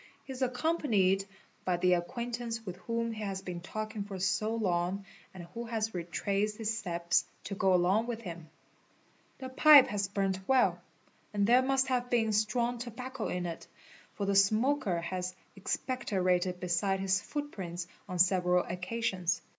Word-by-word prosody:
He 270 - -7
is 260 - -9
accompanied 245 - +2 0.4
by 180 -1 +1
the 180 +1 +3
acquaintance 230 +5 -3
with 185 -2 -6
whom 230 0 -2
he 220 -1 -6
has 195 -2 -3
been 180 -2 -5
talking 215 +3 -5
for 200 -1 -7
so 205 +4 0
long 190 -2 -1 0.3
and 185 -2 -9
who 235 +1 -5
has 225 -1 -2
retraced 200 +4 -1
his 225 0 -1
steps 170 -5 0 0.2
to 200 - -5
go 190 -1 +2
along 190 +6 +2
with 230 -1 -4
him. 170 -5 -8 0.9
'The 260 -1 -7
pipe 285 +1 +8
has 205 -3 -1
burnt 195 -1 -1
well, 265 -1 +3 0.5
and 200 -1 +3
there 245 +4 +6
must 265 0 +2
have 245 -1 0
been 225 -3 +2
strong 235 +3 +1
tobacco 250 +1 -5
in 180 0 -2
it, 165 -1 -6 0.5
for 200 - -2
the 200 - +1
smoker 210 -1 +3
has 180 +1 -4 0.2
expecto 210 0 -2
rated 180 0 +1
beside 180 +2 0
his 190 0 +1
footprints 190 - -5 0.2
on 180 - -3
several 180 0 +4
occasions. 180 -2 -2
200 Hz, 160 wpm, -31 LUFS, 180-235 Hz, 0.9 s, pipe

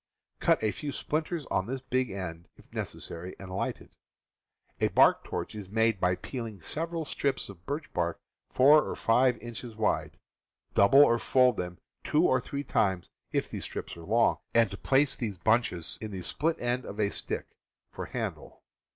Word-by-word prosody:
Cut - - +3
a 110 - +2
few 145 +4 -5
splinters 155 +2 -2
on 95 - +1
this 130 +2 -3
big 130 -1 0
end, 85 -3 -6
if - - -21
necessary, 85 +2 -6
and 95 -1 -9
light - - -2
it. - - -17 0.9
A - - +3
bark - - +5
torch - - -4
is 105 -3 -8
made 110 -1 +2
by 90 0 +2
peeling 115 -2 -6
several 165 - -3
strips 140 -5 -1
of 95 -3 -13
birch 145 +1 -4
bark 85 -1 -1 0.3
four 145 +4 +7
or - - -4
five 125 +2 +3
inches 120 0 -7
wide; 110 -1 0 0.6
double 135 +9 +7
or 115 -2 +3
fold 125 -3 +4
them 90 0 -4 0.3
two 155 +4 +3
or 130 -1 +3
three 140 +2 -4
times 95 -9 0 0.2
if - - 0
the - - -4
strips - - -6
are 85 - -10
long, 115 +7 +2 0.2
and 115 -3 +5
place 135 +1 +3
these 105 -6 -4
bunches 110 -3 +1
in 110 - -4
the 95 -3 -6
split 165 - 0
end 120 +1 -1
of 100 -1 -8
a 105 -1 +2
stick, - - -4 0.4
for - - -6
handle. - - -5
115 Hz, 175 wpm, -29 LUFS, 95-135 Hz, 0.9 s, four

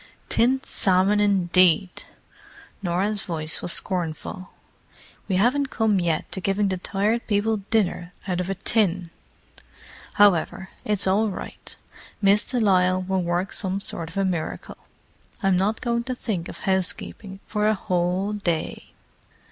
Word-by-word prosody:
"Tinned 260 +3 +2
salmon, 190 +2 +2
indeed!" 185 -3 +3 0.8
Norah's 195 +3 0
voice 160 -2 -2
was 175 - +1
scornful. 180 0 -3 0.8
"We 190 - 0
haven't 255 +8 +2
come 220 -6 +1
yet 170 -3 -1
to 190 - -4
giving 195 +2 +1
the 185 - -1
Tired 205 +5 -1
People 215 +1 +1
dinner 200 -4 -1 0.2
out 180 -2 -1
of 180 +1 -2
a 195 - -1
tin. 185 -4 +1 1.0
However, 190 -1 +3
it's 210 -2 +1
all 205 +3 +2
right: 185 - -8 0.4
Miss 205 +1 +4
de 250 - 0
Lisle 185 -3 +3
will 190 0 0
work 175 +2 -1
some 190 -1 -1
sort 165 -4 -4
of 165 - -10
a 195 - +2
miracle. 175 -4 -3 0.7
I'm 195 -1 +3
not 200 +5 0
going 235 -1 0
to 255 -1 -3
think 195 -9 -3
of - - -10
housekeeping 190 +1 -2
for 210 -1 0
a 215 - +3
whole 185 +1 -1
day!" 175 -6 -3
190 Hz, 140 wpm, -24 LUFS, 180-210 Hz, 1.0 s, Miss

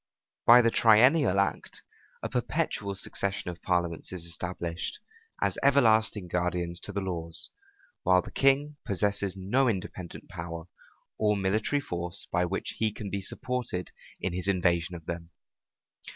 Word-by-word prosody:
By 120 +1 +9
the 115 - +4
triennial 115 - +5
act, 100 - -1 0.4
a - - 0
perpetual 100 -1 -1
succession 100 -1 -2
of 85 - -12
parliaments 85 -2 -1
is 90 -3 -4
established, 85 0 -4 0.5
as - - 0
everlasting 110 -7 +4
guardians 90 0 -1
to - - -7
the 100 0 -2
laws, 85 -3 -3 0.5
while 90 0 +4
the - - -10
king 140 +2 +2
possesses 100 -1 0
no 120 +8 +2
independent 95 -4 -5
power 85 0 -6 0.6
or 105 -1 +3
military 110 +8 +1
force 85 -4 -4
by 90 +1 +2
which 95 +2 -4
he 110 -1 +2
can 100 -1 -7
be 100 - -2
supported 125 -3 -3 0.3
in 95 - -2
his 90 +2 -1
invasion 90 -3 +1
of 85 -2 -10
them. 85 0 -5
95 Hz, 140 wpm, -29 LUFS, 90-110 Hz, 0.6 s, By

